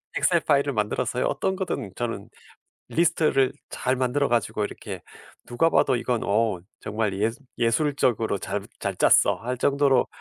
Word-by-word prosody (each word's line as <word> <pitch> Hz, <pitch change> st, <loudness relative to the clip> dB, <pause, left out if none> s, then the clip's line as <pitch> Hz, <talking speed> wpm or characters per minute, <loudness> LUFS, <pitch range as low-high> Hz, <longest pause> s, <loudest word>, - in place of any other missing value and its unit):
엑셀 170 Hz, -2 st, +3 dB
파일을 140 Hz, -2 st, +2 dB
만들어서요 115 Hz, +3 st, -1 dB
어떤 170 Hz, +7 st, 0 dB
거든 180 Hz, -, -3 dB
저는 115 Hz, -2 st, -4 dB, 0.6 s
리스트를 155 Hz, -5 st, +2 dB, 0.2 s
잘 130 Hz, +1 st, -1 dB
만들어 130 Hz, +3 st, +1 dB
가지고 110 Hz, -2 st, 0 dB
이렇게 -, -, -7 dB, 0.4 s
누가 120 Hz, +7 st, +2 dB
봐도 135 Hz, -5 st, +3 dB
"이건 120 Hz, -1 st, -1 dB
어 105 Hz, -2 st, +1 dB, 0.2 s
정말 105 Hz, -1 st, -2 dB
예수 115 Hz, +5 st, -1 dB, 0.2 s
예술적으로 120 Hz, -3 st, +1 dB
잘 100 Hz, +2 st, -3 dB, 0.2 s
잘 -, -, -2 dB
짰어." -, -, +5 dB
할 125 Hz, +2 st, -4 dB
정도로 140 Hz, -1 st, +3 dB
125 Hz, 320 characters per minute, -25 LUFS, 110-140 Hz, 0.6 s, 짰어